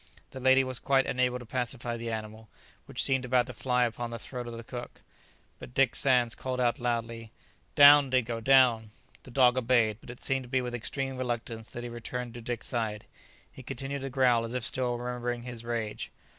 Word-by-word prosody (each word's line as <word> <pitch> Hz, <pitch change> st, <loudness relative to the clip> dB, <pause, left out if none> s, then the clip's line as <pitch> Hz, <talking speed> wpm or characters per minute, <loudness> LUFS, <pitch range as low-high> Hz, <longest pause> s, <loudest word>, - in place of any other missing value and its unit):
The 130 Hz, -, -8 dB
lady 130 Hz, +1 st, +5 dB
was 130 Hz, -1 st, -2 dB
quite 135 Hz, -1 st, +2 dB
unable 125 Hz, 0 st, 0 dB
to 125 Hz, -, -10 dB
pacify 120 Hz, 0 st, -2 dB
the 115 Hz, 0 st, -5 dB
animal, 110 Hz, 0 st, -6 dB, 0.4 s
which -, -, -1 dB
seemed 135 Hz, -1 st, +2 dB
about 125 Hz, -1 st, +2 dB
to 130 Hz, -, -8 dB
fly 125 Hz, +2 st, +1 dB
upon 120 Hz, 0 st, -2 dB
the 115 Hz, -, -5 dB
throat 125 Hz, +1 st, -7 dB
of 115 Hz, -1 st, -7 dB
the 115 Hz, -, -8 dB
cook, 120 Hz, +1 st, -9 dB, 0.6 s
but 125 Hz, -, -11 dB
Dick 135 Hz, -3 st, +3 dB
Sands 125 Hz, -4 st, +3 dB
called 130 Hz, -1 st, -4 dB
out 120 Hz, -1 st, +1 dB
loudly, 115 Hz, -2 st, -3 dB, 0.4 s
"Down, 145 Hz, -1 st, +8 dB
Dingo, 120 Hz, -3 st, 0 dB
down!" 120 Hz, -3 st, +4 dB, 0.3 s
The -, -, -14 dB
dog 125 Hz, 0 st, +4 dB
obeyed; 115 Hz, -3 st, +2 dB
but -, -, -14 dB
it 120 Hz, -, -9 dB
seemed 135 Hz, 0 st, 0 dB
to 125 Hz, -, -11 dB
be 130 Hz, -, +1 dB
with 125 Hz, -1 st, -5 dB
extreme 135 Hz, +2 st, -3 dB
reluctance 120 Hz, -2 st, -4 dB
that 120 Hz, -, -7 dB
he 120 Hz, -, -5 dB
returned 120 Hz, 0 st, -5 dB
to 120 Hz, -, -8 dB
Dick's 120 Hz, 0 st, -4 dB
side; 110 Hz, -4 st, -2 dB, 0.5 s
he -, -, -12 dB
continued 135 Hz, +2 st, -5 dB
to 135 Hz, -, -4 dB
growl, 125 Hz, -3 st, +3 dB
as 115 Hz, +2 st, -5 dB
if 125 Hz, -, -2 dB
still 125 Hz, 0 st, -1 dB
remembering 120 Hz, 0 st, -4 dB
his 120 Hz, -2 st, -7 dB
rage. 115 Hz, -3 st, -3 dB
120 Hz, 205 wpm, -29 LUFS, 115-130 Hz, 0.6 s, Down